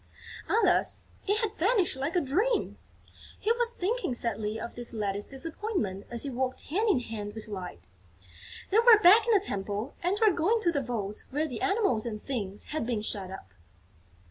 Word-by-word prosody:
Alas, 455 - +3 0.2
it 415 +3 +2
had 430 -1 -1
vanished 385 - +2
like 280 +7 -3
a - - +5
dream! 395 - 0 0.6
He 440 - +1
was 475 0 +1
thinking 425 - -2
sadly 220 -2 -2
of 235 - -6
this 240 -1 -7
latest 205 -1 -3
disappointment 275 - -4
as 235 -1 -3
he 280 - -4
walked 260 +1 -2
hand 425 +7 +2
in 280 -11 +3
hand 210 -3 -6
with 220 - -4
Light. 180 - -7 0.8
They 425 - +5
were 465 -1 +8
back 425 +4 +7
in 465 - +4
the - - +6
Temple 205 - -3
and 360 +3 0
were 440 -2 +5
going 375 +7 +2
to 345 -5 +2
the 285 - 0
vaults 215 -5 -3
where 300 +4 0
the 270 - -6
Animals 390 - +1
and 215 -2 -4
Things 210 -6 -4
had 310 - -1
been 225 -4 -1
shut 195 -3 -2
up. 140 - -10
270 Hz, 185 wpm, -29 LUFS, -, 0.8 s, were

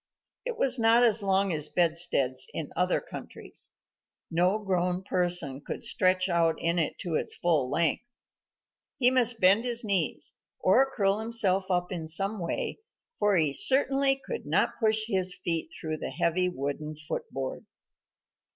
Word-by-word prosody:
It - - -4
was 260 - +3
not 230 +2 +4
as 225 -2 +4
long 195 -1 +1
as 150 -1 0
bedsteads 165 -7 +2
in 155 - -5
other 180 +1 +1
countries. - - -9 0.6
No 180 +5 +2
grown 180 -3 -1
person 175 -8 +1
could - - -6
stretch 185 0 +1
out 170 -2 +1
in 170 +1 0
it 160 - -2
to 175 - -4
his - - -1
full 155 -7 0
length. 165 +1 0 1.0
He 250 -1 +3
must 245 -3 +3
bend 195 +5 +4
his 240 -1 +2
knees, 195 -7 0 0.3
or 260 +9 +3
curl 200 -4 0
himself 200 -4 0
up 180 0 -1
in 165 -3 -5
some 195 +6 +1
way, 170 - -4 0.4
for 205 -2 +2
he 155 -4 +2
certainly 270 - +3
could 470 - -6
not - - 0
push 220 -2 +2
his 185 -4 0
feet 165 -2 -1
through 155 -1 -4
the - - -5
heavy 175 +4 0
wooden 150 0 -5
foot 155 +1 -6
board. 135 -1 -6
185 Hz, 155 wpm, -27 LUFS, 165-220 Hz, 1.0 s, not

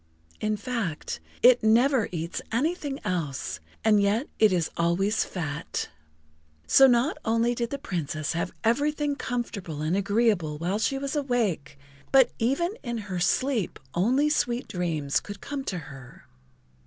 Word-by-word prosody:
In 215 0 0
fact, 205 -8 -3 0.2
it 245 0 +7
never 235 +2 +3
eats 170 -1 -4
anything 285 +3 -1
else, 165 -9 -2 0.3
and 210 -2 +5
yet 210 +7 +1
it 215 -2 +6
is 175 -3 0
always 195 +6 +1
fat. 160 -3 -4 0.8
So 270 - +7
not 245 +4 +2
only 230 +1 +2
did 235 -1 -2
the 280 - -3
Princess 155 - -3
have 170 +2 -2
everything 290 +5 +1
comfortable 200 - -4
and 160 +4 +1
agreeable 200 -6 +1
while 180 +6 -1
she 270 +4 0
was 275 +2 -3
awake, 220 - -1 0.3
but 265 -2 +6
even 280 - +1
in 235 -2 -3
her 200 -4 -4
sleep 240 +3 0 0.2
only 250 +11 +2
sweet 245 -5 0
dreams 160 -6 -1
could 205 0 -9
come 285 -1 -5
to 185 - -2
her. 135 -5 -11
215 Hz, 140 wpm, -26 LUFS, 175-255 Hz, 0.8 s, it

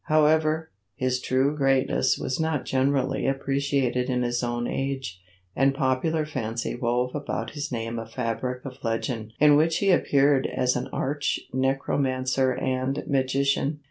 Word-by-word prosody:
However, 155 +1 +2 0.2
his 130 0 -1
true 135 +4 +1
greatness 135 -2 +2
was 130 - -3
not 160 -3 -1
generally 135 0 +1
appreciated 135 -2 0
in 125 -1 +1
his 120 0 -1
own 120 0 -2
age, 135 -9 -3 0.3
and 135 +1 +3
popular 145 +3 0
fancy 115 -6 -3
wove 125 +1 -1
about 145 -1 -3
his 145 -1 -5
name 115 -1 -3
a 115 - -7
fabric 125 +3 -3
of 135 0 -9
legend 115 -1 -2
in 150 0 +7
which 160 +2 +3
he 200 -1 +3
appeared 140 -5 +3
as 125 -1 0
an 125 - -2
arch 145 +2 -1
necromancer 130 0 +1
and 130 +1 -1
magician. 140 +2 +1
135 Hz, 140 wpm, -25 LUFS, 125-140 Hz, 0.3 s, in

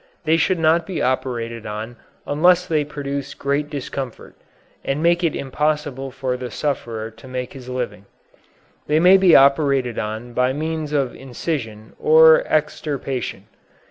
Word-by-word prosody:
They 160 +1 +4
should 175 +3 +2
not 165 +1 +2
be 185 -4 -3
operated 120 -3 -2
on 110 +3 -6 0.3
unless 175 +5 +3
they 155 -4 +1
produce 140 -1 -5
great 140 +1 -1
discomfort, 135 -3 -6 0.5
and 140 +3 -2
make 170 +1 +3
it 165 - +1
impossible 145 -1 -2
for 130 -1 -3
the 125 -1 -6
sufferer 115 -5 -3
to 115 +3 -15
make 125 -1 -5
his 130 -2 -10
living. 110 -6 -5 0.8
They 150 +1 +3
may 180 +3 +7
be 190 -3 +5
operated 140 -3 +3
on 110 +3 -5
by 125 +2 +1
means 155 +1 -3
of 140 -4 0
incision 120 -5 -5
or 160 +1 +6
extirpation. 145 -4 -2
140 Hz, 140 wpm, -21 LUFS, 125-155 Hz, 0.8 s, may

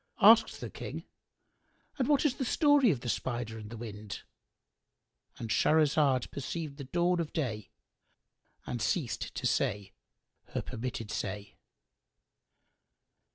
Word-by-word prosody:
Asked 220 +2 +7
the - - -5
King, - - -6 1.0
"And 255 - +2
what 290 0 +4
is 275 -3 +2
the 275 - -1
story 290 0 +4
of 135 -10 0
the 125 - -6
Spider 120 -2 -2
and 105 -1 -9
the 115 - -7
Wind?"—And 110 +1 -11
Shahrazad 145 +1 +3
perceived 145 +1 -5
the 140 - -7
dawn 175 +5 +1
of 165 -2 -2
day 110 -10 -2 1.0
and 120 - -4
ceased 130 +2 -1
to - - -3
say 100 -1 0 0.6
her - - 0
permitted 115 -2 -5
say. 105 0 -4
130 Hz, 120 wpm, -31 LUFS, 110-175 Hz, 1.0 s, Asked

